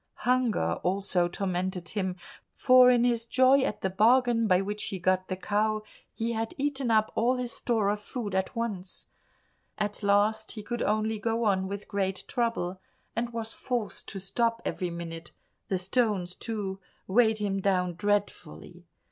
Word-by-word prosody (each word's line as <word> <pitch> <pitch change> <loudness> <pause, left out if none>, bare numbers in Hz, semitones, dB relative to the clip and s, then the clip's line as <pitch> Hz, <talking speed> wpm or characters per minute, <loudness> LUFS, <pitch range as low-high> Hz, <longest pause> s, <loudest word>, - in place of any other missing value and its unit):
Hunger 250 -2 +2
also 185 -1 +1
tormented 180 -1 -3
him, 190 -3 -2 0.4
for 255 -1 +7
in 245 -1 +4
his 235 -2 +2
joy 260 +3 +4
at 210 -5 -2
the 190 - 0
bargain 230 +2 +4
by 185 -2 +4
which 205 +2 -3
he 195 - -4
got 185 +1 +1
the 185 - -2
cow 215 +3 0 0.3
he 230 +1 -2
had 225 +8 -3
eaten 275 -3 -1
up 215 -1 +3
all 245 +3 +2
his 250 -1 -2
store 225 -5 0
of 205 0 0
food 210 -1 -5
at 190 +5 -1
once. 205 -6 -4 0.7
At 210 0 -2
last 210 +2 +2
he 215 - -7
could 240 +3 -4
only 215 +1 0
go 230 +1 -1
on 190 -3 +2
with 200 +1 -6
great 195 -2 -2
trouble, 230 -7 -1 0.3
and 235 +1 -2
was 225 -1 -4
forced 240 -4 -4
to 195 - -6
stop 230 +4 0
every 180 -2 -2
minute; 170 -1 -7 0.3
the 190 - 0
stones, 190 -2 0
too, 205 -4 -4 0.3
weighed 220 +2 +3
him 200 -2 -1
down 180 -2 +1
dreadfully. 205 - -3
210 Hz, 165 wpm, -28 LUFS, 190-235 Hz, 0.7 s, for